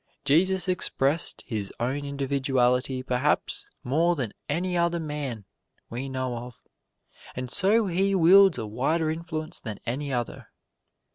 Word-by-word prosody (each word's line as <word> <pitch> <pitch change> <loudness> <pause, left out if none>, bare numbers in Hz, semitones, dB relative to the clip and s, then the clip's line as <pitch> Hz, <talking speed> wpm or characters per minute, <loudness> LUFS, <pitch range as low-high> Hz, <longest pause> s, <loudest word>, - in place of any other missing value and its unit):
Jesus 185 +6 +3
expressed 160 -4 +1
His 105 -5 -4
own 135 +4 -2
individuality 135 -2 0
perhaps 130 +4 0 0.2
more 165 +7 +2
than 125 -9 -3 0.2
any 180 +5 -1
other 170 0 +1
man 145 - -5 0.5
we 130 +4 -4
know 130 -2 -3
of, 120 0 -8 0.8
and 125 -1 -4
so 210 - +4
He 195 +2 +1
wields 190 +1 +6
a 110 - -3
wider 155 +9 0
influence 160 0 -5
than 110 -3 -6
any 140 +4 -3
other. 120 -2 -3
140 Hz, 130 wpm, -26 LUFS, 125-170 Hz, 0.8 s, wields